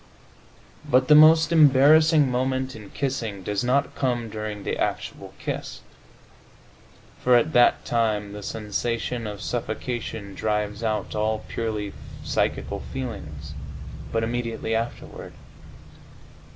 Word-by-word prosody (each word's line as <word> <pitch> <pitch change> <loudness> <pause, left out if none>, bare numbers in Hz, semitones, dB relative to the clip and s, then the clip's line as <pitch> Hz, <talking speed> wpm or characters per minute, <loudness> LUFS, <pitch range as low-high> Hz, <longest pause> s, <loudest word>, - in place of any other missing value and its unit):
But 130 +2 +2
the - - +9
most 155 +1 +7
embarrassing 150 -1 +6
moment, 130 +1 -1
in 105 -3 -11
kissing, 115 -8 -3
does 105 +3 -1
not 135 +3 +1
come 120 -5 -1
during 105 -1 -5
the - - -3
actual - - -3
kiss - - -5 1.4
(for 125 0 +5
at 155 +6 +2
that 120 0 +4
time 105 -3 0
the 105 - -7
sensation 115 +2 -3
of 105 -1 -7
suffocation 110 0 -4
drives 105 0 -2
out 110 -3 -1
all 110 0 -1
purely 105 -3 -3 0.3
psychical - - -1
feelings), 80 - -6 0.6
but 115 0 0
immediately 115 -1 -2
afterward. 115 +1 -4
115 Hz, 110 wpm, -25 LUFS, 105-130 Hz, 1.4 s, the